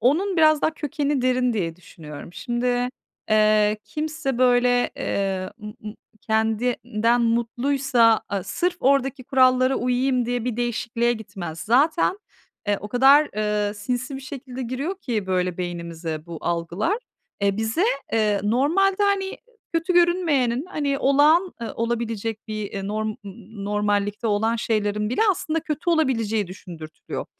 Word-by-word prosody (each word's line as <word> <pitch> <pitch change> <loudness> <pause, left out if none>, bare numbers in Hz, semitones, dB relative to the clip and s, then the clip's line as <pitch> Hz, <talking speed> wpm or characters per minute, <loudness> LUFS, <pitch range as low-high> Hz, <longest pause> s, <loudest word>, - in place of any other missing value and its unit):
onun 345 - +2
biraz 310 -2 +5
daha - - +3
kökeni 290 -2 -1
derin 255 -1 +2
diye 170 -6 -2
düşünüyorum. 160 -2 -11
Şimdi, 245 +2 -1 0.4
eee, 215 0 +4
kimse 305 -4 -3
böyle, 245 -1 +3
eee, 190 -1 -2
ımm 210 0 -7
ımm, 210 - -6 0.3
kendinden 225 +1 +1
mutluysa 235 0 +2
a 200 -2 -2
sırf 355 - -1
oradaki 270 -1 +1
kurallara 255 0 +4
uyuyayım 250 0 +1
diye 245 -1 -2
bir 245 -2 -2
değişikliğe 240 0 0
gitmez. 190 -7 -7
Zaten, 310 - +2 0.5
eee, 205 - +3
o 210 - -7
kadar, 270 +6 +5
eee, 210 -1 0
sinsi 250 +5 -3
bir - - -7
şekilde 260 -1 -7
giriyor 275 +11 -3
ki 220 - -3
böyle 180 -1 -1
beynimize 170 -2 -5
bu 170 -2 -7
algılar, 175 - -1 0.4
eee, 200 0 +2
bize, 225 - 0 0.3
eee, 210 -3 +2
normalde, 340 - +2
hani, 395 -1 0 0.4
kötü 330 +2 +1
görünmeyenin, 320 -8 +2
hani, 280 -5 -1
olağan, 300 +7 +4
ııı, 230 - -4
olabilecek 230 -2 -3
bir, 215 -2 -4
ııı, 195 0 -4
norm 215 +1 -2
ımm 215 - -5
ımm, 200 +1 -10
normallikte 205 +1 0
olan 220 +2 +1
şeylerin 210 -1 -1
bile 250 - -1
aslında 325 -3 -1
kötü 310 +2 -2
olabileceği 230 - +1
düşündürtülüyor. 170 -4 -8
235 Hz, 140 wpm, -23 LUFS, 210-275 Hz, 0.5 s, biraz